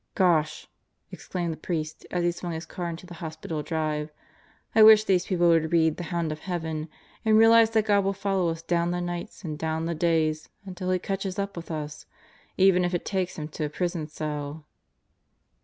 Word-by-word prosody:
"Gosh!" 170 -5 +2 0.4
exclaimed 175 -2 -4
the - - -9
priest 155 -2 -4
as 175 -1 -1
he 175 - +3
swung 175 0 -5
his 160 +1 -5
car 175 -1 -5
into 165 +2 -7
the 175 - -10
hospital 160 -1 -5
drive. 155 -1 -2 0.6
"I 220 - +5
wish 215 0 +9
these 185 -4 +1
people 175 -2 +3
would 160 -1 +3
read 160 -2 +3
The 175 - -5
Hound 170 -2 -2
of 155 - -5
Heaven 160 -3 -4 0.3
and 220 -1 +4
realize 225 0 +7
that 220 -1 +2
God 205 -2 +3
will 195 - +1
follow 195 -3 0
us 165 0 -4
'down 170 0 +1
the 175 0 -1
nights 175 +2 -5
and 155 -3 -5
down 160 0 -1
the 170 - -1
days/ 160 -1 +1 0.2
until 185 -1 -5
He 185 - +3
catches 195 0 -3
up 200 0 -3
with 170 -1 -8
us 150 -2 -5 0.5
even 185 -1 +5
if 175 0 0
it 175 - -3
takes 190 -2 -2
Him 150 -1 -4
to 155 0 -3
a - - -3
prison 170 -1 -2
cell." 150 0 -5
170 Hz, 200 wpm, -26 LUFS, 160-185 Hz, 0.6 s, wish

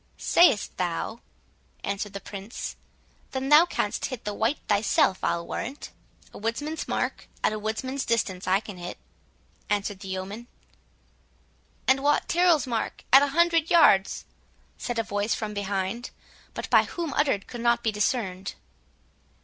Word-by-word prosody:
"Sayst 295 -12 +4
thou?" 180 +6 -2 0.6
answered 200 0 -3
the 200 - -5
Prince; 200 +2 -7 0.6
"then 265 0 -2
thou 305 +4 +8
canst - - -1
hit 255 -5 -7
the 210 - -2
white 225 +8 0
thyself, 200 -2 +2
I'll 170 0 0
warrant." 265 +5 -5 0.4
"A - - -9
woodsman's 290 +9 -3
mark, - - -2 0.2
and - - +3
at 215 - -4
woodsman's 260 +6 -2
distance, 200 -5 -1
I 190 +2 +3
can 205 -4 -9
hit," 175 0 -7 0.7
answered 205 -1 -1
the 195 - -9
yeoman. 190 +5 -5 1.4
"And 265 +1 +4
Wat 290 +1 +2
Tyrrel's 340 -5 +4
mark, 235 -3 -3
at 270 - +10
a 285 - +3
hundred 335 -2 +4
yards," 200 - +5 0.5
said 240 -1 -4
a 225 - +1
voice 205 +1 -1
from 215 -2 -4
behind, 200 +3 -2 0.5
but - - -4
by - - +6
whom 335 -5 -4
uttered 270 -9 +1
could 240 -2 -7
not 235 0 +2
be 225 - +2
discerned. 205 -3 -1
225 Hz, 150 wpm, -26 LUFS, 200-270 Hz, 1.4 s, at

